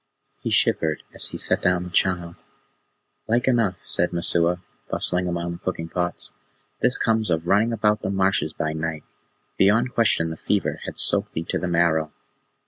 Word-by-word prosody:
He -, -, -3 dB
shivered 80 Hz, -1 st, +2 dB
as -, -, 0 dB
he -, -, -6 dB
set -, -, +1 dB
down 90 Hz, -1 st, +2 dB
the 90 Hz, -, -8 dB
child. 90 Hz, -2 st, 0 dB, 0.9 s
"Like 120 Hz, +3 st, +1 dB
enough," 115 Hz, -7 st, +2 dB
said 90 Hz, -, 0 dB
Messua, 85 Hz, 0 st, +2 dB, 0.3 s
bustling 90 Hz, 0 st, -1 dB
among 85 Hz, 0 st, -2 dB
the 85 Hz, -, -7 dB
cooking 85 Hz, -3 st, -4 dB
pots. 90 Hz, 0 st, -2 dB, 0.5 s
"This 125 Hz, 0 st, +2 dB
comes 110 Hz, -3 st, +1 dB
of 80 Hz, -1 st, 0 dB
running 105 Hz, +6 st, +3 dB
about 105 Hz, -2 st, +1 dB
the -, -, -2 dB
marshes 95 Hz, -4 st, +1 dB
by 80 Hz, 0 st, -3 dB
night. 80 Hz, -1 st, -3 dB, 0.6 s
Beyond 110 Hz, +6 st, +3 dB
question, 85 Hz, -8 st, +2 dB
the 80 Hz, -, -6 dB
fever -, -, -1 dB
had -, -, -6 dB
soaked -, -, +3 dB
thee 80 Hz, -, -3 dB
to -, -, 0 dB
the 90 Hz, -, -3 dB
marrow." 85 Hz, -2 st, +1 dB
90 Hz, 170 wpm, -23 LUFS, 85-105 Hz, 0.9 s, running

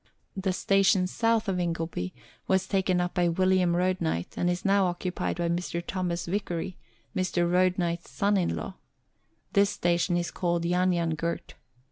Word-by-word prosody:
The 190 Hz, -1 st, -1 dB
station 195 Hz, 0 st, +3 dB
south 225 Hz, +4 st, +1 dB
of 185 Hz, -2 st, 0 dB
Ingleby 165 Hz, -, -2 dB, 0.4 s
was 190 Hz, 0 st, +2 dB
taken 190 Hz, -2 st, +1 dB
up 180 Hz, 0 st, -1 dB
by 175 Hz, -2 st, +2 dB
William 185 Hz, 0 st, +2 dB
Road 185 Hz, +1 st, +1 dB
knight, 90 Hz, -, -2 dB
and 175 Hz, -, +1 dB
is 175 Hz, +2 st, -2 dB
now 195 Hz, -1 st, +4 dB
occupied 180 Hz, +1 st, -2 dB
by 170 Hz, -1 st, 0 dB
Mr. 170 Hz, 0 st, -1 dB
Thomas 175 Hz, -2 st, -2 dB
Vicary, 180 Hz, -1 st, -3 dB, 0.4 s
Mr. 175 Hz, -2 st, +1 dB
Roadknight's 175 Hz, -1 st, +1 dB
son 205 Hz, 0 st, +1 dB
in 185 Hz, -3 st, +1 dB
law. 190 Hz, -, -6 dB, 0.8 s
This 200 Hz, -1 st, +4 dB
station 175 Hz, -1 st, +1 dB
is 175 Hz, 0 st, -2 dB
called 170 Hz, -2 st, -1 dB
Yan 180 Hz, +1 st, +2 dB
Yan 170 Hz, -1 st, 0 dB
Gurt. 170 Hz, +2 st, -3 dB
180 Hz, 160 wpm, -28 LUFS, 170-190 Hz, 0.8 s, now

